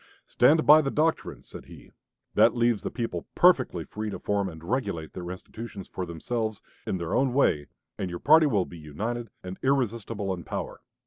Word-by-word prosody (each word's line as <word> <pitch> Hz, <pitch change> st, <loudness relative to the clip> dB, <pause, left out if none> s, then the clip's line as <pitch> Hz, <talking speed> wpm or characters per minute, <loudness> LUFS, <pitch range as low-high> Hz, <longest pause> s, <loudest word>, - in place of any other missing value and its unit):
"Stand 155 Hz, +1 st, +4 dB
by 155 Hz, +1 st, +8 dB
the 140 Hz, -, -1 dB
doctrine," 155 Hz, +3 st, -1 dB
said -, -, -11 dB
he, -, -, -14 dB, 0.4 s
"that -, -, +5 dB
leaves 120 Hz, -2 st, +2 dB
the -, -, -3 dB
people 100 Hz, -, -4 dB
perfectly -, -, +4 dB
free 110 Hz, 0 st, -5 dB
to -, -, -5 dB
form 100 Hz, -1 st, -1 dB
and 80 Hz, -2 st, -11 dB
regulate 85 Hz, -7 st, -2 dB
their 90 Hz, -1 st, -6 dB
institutions 100 Hz, +2 st, -8 dB
for 90 Hz, -, -5 dB
themselves, 110 Hz, +6 st, -3 dB, 0.3 s
in 95 Hz, -, -1 dB
their 85 Hz, -2 st, -4 dB
own 130 Hz, -1 st, +2 dB
way, 75 Hz, -, +2 dB, 0.3 s
and 95 Hz, -, -2 dB
your 85 Hz, -, -4 dB
party 155 Hz, -, +6 dB
will 100 Hz, -9 st, +1 dB
be 85 Hz, -, -11 dB
united 110 Hz, +11 st, -4 dB
and 90 Hz, +1 st, -7 dB
irresistible 115 Hz, -6 st, 0 dB
in 85 Hz, -2 st, -7 dB
power. -, -, -5 dB
105 Hz, 185 wpm, -27 LUFS, 90-125 Hz, 0.4 s, by